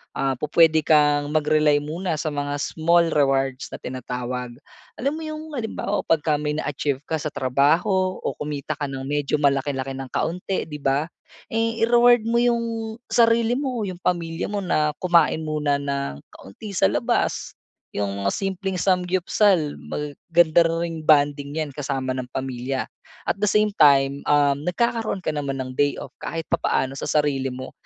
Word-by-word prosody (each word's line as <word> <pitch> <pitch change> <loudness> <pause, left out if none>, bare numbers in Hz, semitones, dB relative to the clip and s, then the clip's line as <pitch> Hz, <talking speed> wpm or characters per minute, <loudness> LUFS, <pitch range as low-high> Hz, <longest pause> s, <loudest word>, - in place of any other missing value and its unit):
ah, 135 -1 0
pu-puwede 155 +3 +3
kang 145 -1 +3
mag-rely 150 -1 +3
muna 165 +4 -3
sa - - -3
mga 145 0 -2
small 170 +3 +2
rewards 135 -2 +1
na - - -7
tinatawag. 125 0 -5 0.5
Alam 275 +3 0
mo 320 - -6
'yong 310 0 -6
halimbawa 220 -4 -2
'pagka 155 -1 +2
may 150 0 -2
na-achieve 140 -2 -2
ka 160 - -1
sa 150 0 -4
trabaho 170 +10 +1
o - - -3
kumita 150 0 -4
ka 145 -1 -3
ng 135 -1 -5
medyo 145 +1 0
malaki-laki 135 -1 0
ng 135 -1 -7
kaunti 180 +2 -2
'di 150 -2 -6
ba? 140 +2 0 0.4
Eh, 230 0 -1
I-reward 240 0 +5
mo 230 - 0
'yong 235 -1 +2 0.4
sarili 230 0 +3
mo, 255 -4 -2
'yong 180 -2 -6
pamilya 165 -2 -1
mo 205 - -1
na 155 -5 +1
kumain 170 -4 +3
muna 150 -2 0
na 140 - -3
nang - - -11
kaunti 200 - -10
sa - - +4
labas. 240 0 -1 0.4
'Yong 100 -1 -2
mga - - +2
simpleng 195 0 -3
삼겹살, 180 -2 +2
mag 150 -1 -5 0.2
ganda 170 0 +5
ring 165 0 -2
bonding 145 -1 +3
'yan 155 -2 -3
kasama 135 -2 -2
ng 130 -1 -4
pamilya. 130 0 -3 0.4
At - - 0
the 210 - +2
same 210 +1 +3
time, 140 -1 +5
uhm, 145 0 +2
nagkakaroon 225 -1 -1
ka - - 0
naman 140 -2 -3
ng 130 - -7
day-off 145 -1 0
kahit 165 -1 -4
papaano 130 0 0
sa - - -4
sarili 145 -3 +1
mo, 130 +1 -7
150 Hz, 160 wpm, -23 LUFS, 140-185 Hz, 0.5 s, I-reward